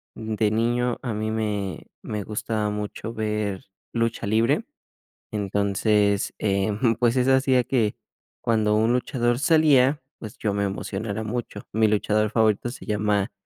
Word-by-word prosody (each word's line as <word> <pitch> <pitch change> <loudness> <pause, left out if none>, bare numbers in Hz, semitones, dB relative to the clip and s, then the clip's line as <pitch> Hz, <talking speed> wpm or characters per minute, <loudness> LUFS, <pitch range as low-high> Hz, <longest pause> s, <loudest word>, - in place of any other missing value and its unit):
de 110 -1 -1
niño 120 +2 0
a 120 -4 -3
mí 110 +1 -2
me 105 -3 -3 0.2
me 105 -2 -4
gustaba 105 0 -2
mucho 105 +2 -5
ver 105 -3 -2 0.3
lucha 115 -2 -1
libre, 110 +3 +2 0.7
entonces, 100 0 +1
eh, 100 0 +1 0.3
pues, 120 0 +3
eso 130 +1 +4
hacía 130 -1 +3
que 115 -4 0 0.5
cuando 110 -2 +2
un 110 +2 +3
luchador 120 -1 0
salía, 150 -3 +4 0.2
pues, 110 -2 -9
yo 105 - -1
me 100 0 0
emocionara 100 +2 -3
mucho. 110 -2 -4
Mi 110 0 +3
luchador 105 0 +1
favorito 110 0 +2
se - - -10
llama 105 -1 0
110 Hz, 140 wpm, -24 LUFS, 105-120 Hz, 0.7 s, eso